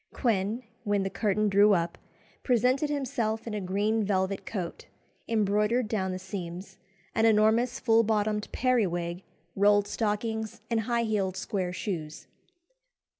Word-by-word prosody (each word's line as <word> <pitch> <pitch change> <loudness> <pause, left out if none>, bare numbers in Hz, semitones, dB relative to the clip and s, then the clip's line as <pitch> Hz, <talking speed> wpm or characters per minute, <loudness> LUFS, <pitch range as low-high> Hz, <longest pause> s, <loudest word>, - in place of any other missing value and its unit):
Quin, 220 0 0 0.2
when 205 -2 +1
the 195 - -3
curtain 210 -1 +1
drew 205 +1 +5
up, 170 -2 0 0.5
presented 255 +4 +2
himself 250 -6 -2
in 225 - -5
a 210 - -2
green 205 +4 0
velvet 190 -1 -1
coat, 185 -6 -5 0.4
embroidered 210 +2 +1
down 190 -4 -1
the 185 - -3
seams, 190 0 -7 0.3
an 225 0 +3
enormous 225 +3 +3
full 225 -2 +4
bottomed 210 -1 0
periwig, 180 -9 0 0.3
rolled 205 +1 +4
stockings, 220 0 -2
and 230 - +2
high 235 +1 0
heeled 200 -4 -1
square 185 -3 -2
shoes. 165 -5 -5
210 Hz, 130 wpm, -28 LUFS, 190-225 Hz, 0.5 s, drew